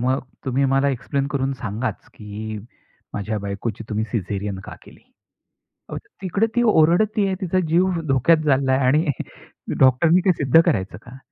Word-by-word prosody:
"मग 130 +2 +1 0.2
तुम्ही 135 +1 0
मला 135 +1 +3
एक्सप्लेन 140 +1 -2
करून 135 -1 -1
सांगाच, 115 +3 -4
की 105 0 -7 0.6
माझ्या 105 +1 -3
बायकोची 100 +3 -5
तुम्ही 110 0 -1
सिझेरियन 100 -2 -3
का - - -9
केली?" - - -17 0.9
अहो - - -5 0.2
तिकडे 195 +4 0
ती 240 - +3
ओरडतीये, 200 +2 +3
तिचा 185 0 0
जीव 175 +2 +2
धोक्यात 135 +5 +4
चाललाय 135 -1 +2
आणि 150 +5 +3 0.7
डॉक्टरनी 160 +7 +4
ते 185 - +5
सिद्ध 145 +2 +4
करायचं 95 - -1
का? 125 +3 -13
135 Hz, 145 wpm, -22 LUFS, 110-165 Hz, 0.9 s, ते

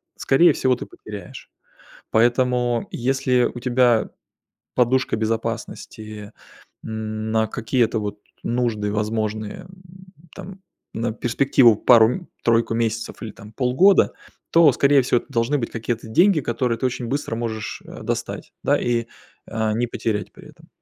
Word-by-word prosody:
скорее 155 +3 +4
всего, 130 -1 +1
ты - - -7
потеряешь. 100 -4 -10 0.6
Поэтому 120 0 +2
если 125 0 +1
у 120 - -7
тебя 120 -2 +2 0.6
подушка 130 0 +2
безопасности, 110 -1 -4 0.5
м, 110 0 -4
на 110 0 +2
какие-то 115 +1 0
вот 105 0 -5 0.3
нужды 115 -4 -1
возможные, 110 0 -2
э, - - -14 0.7
там, 190 0 -10 0.3
на 115 0 -2
перспективу, 120 0 +3
пару-тройку 115 - +3
месяцев 115 0 -2
или, 110 - -5
там, 105 +1 -14
полгода, 135 - +4 0.4
то, 165 -5 +6
скорее 140 +2 +4
всего, 120 -1 +2
это - - -19
должны 120 +5 +1
быть 115 - -3
какие-то 115 0 -4
деньги, 175 - +4
которые 120 -1 -1
ты - - -4
очень 125 -1 -3
быстро 135 -3 -3
можешь, 110 -2 -4
э, - - -10
достать, - - -4
да, - - +3
и, 120 -1 0 0.4
э, 110 -1 -1
не 120 +2 0
потерять 110 -3 -3
при - - -15
этом. - - -19
115 Hz, 135 wpm, -22 LUFS, 110-125 Hz, 0.7 s, то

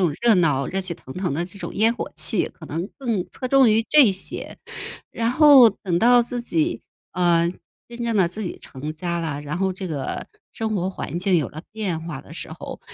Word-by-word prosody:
种 160 -5 +1
热 235 -2 +5
闹、 150 -7 +2
热 195 +1 -2
气 185 -2 -4
腾 130 -5 -10
腾 180 -3 -2
的 165 +5 -1
这 190 +3 -13
种 - - -6
烟 225 +3 +3
火 - - -5
气， - - +1
可 - - -13
能 170 +4 -4
更 230 -9 -1
侧 255 - -5
重 265 -2 +5
于 225 +1 +3
这 280 -9 +7
些。 190 0 -6 0.5
然 230 0 0
后 275 -4 +8
等 180 -4 -2
到 245 +1 +6
自 240 0 -2
己， 325 +6 0 0.3
呃， 170 -1 +3 0.4
真 240 0 -10
正 230 -2 0
的 190 - +4
自 195 +6 -5
己 180 - -5
成 145 +3 -7
家 170 +1 -3
了， 150 -3 -3
然 150 +3 -4
后 190 0 0
这 185 0 -6
个 145 -5 -4 0.3
生 220 -1 -2
活 185 0 -1
环 170 - -5
境 185 -1 +3
有 155 - +1
了 155 +2 -9
变 200 -7 -3
化 165 -5 -6
的 - - -15
时 - - -7
候， - - -8
190 Hz, 235 characters per minute, -23 LUFS, 170-230 Hz, 0.5 s, 后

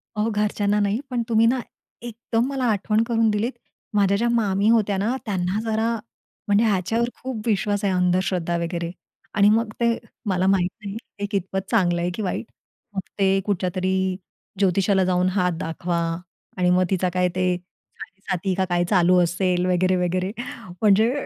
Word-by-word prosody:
अहो, 215 +2 0
घरच्यांना 210 0 +1
नाही, 205 +3 +1
पण 245 -2 -1
तुम्ही 225 0 +4
ना 255 +2 +2 0.4
एकदम 235 0 -2
मला 270 -2 -2
आठवण 215 +2 +1
करून 230 -1 +2
दिलीत. 210 +4 0 0.4
माझ्या 200 -1 +3
ज्या 235 +3 +1
मामी 210 -3 +2
होत्या 210 -4 +3
ना, 220 +6 0
त्यांना 190 -1 -1
जरा 225 +1 +1 0.5
म्हणजे 205 +2 +4
ह्याच्यावर 225 +4 +1
खूप 255 -4 -4
विश्वास 205 -1 0
आहे 195 - +2
अंधश्रद्धा 180 -1 +1
वगैरे. 170 0 -3 0.4
आणि 205 0 +5
मग 225 +1 +2
ते 235 -1 +2 0.3
मला 185 0 +1
माहीत 185 -2 +3 0.2
नाही 200 +1 -5 0.2
हे 205 - -1
कितपत 190 -1 -2
चांगलं 175 -6 +2
आहे 175 - 0
की 220 - -4
वाईट. 195 +3 -2 0.5
मग 190 - -1 0.2
ते 195 0 +3
कुठल्या 190 -3 0
तरी 190 0 0 0.4
ज्योतिषाला 195 0 +3
जाऊन 180 0 +2
हात 180 -1 +1
दाखवा. 170 +1 -2 0.6
आणि 180 -1 +2
मग 180 +1 +4
तिचा 185 -1 +1
काय 180 0 +2
ते 185 -1 +1 0.4
साडे 195 +1 -12
साती 185 +1 0
का 190 0 +1
काय 175 0 +2
चालू 180 -2 +4
असेल? 180 +1 0
वगैरे, 185 +1 +2
वगैरे 180 +1 0 0.5
म्हणजे 215 +3 +5
195 Hz, 165 wpm, -23 LUFS, 180-215 Hz, 0.6 s, आणि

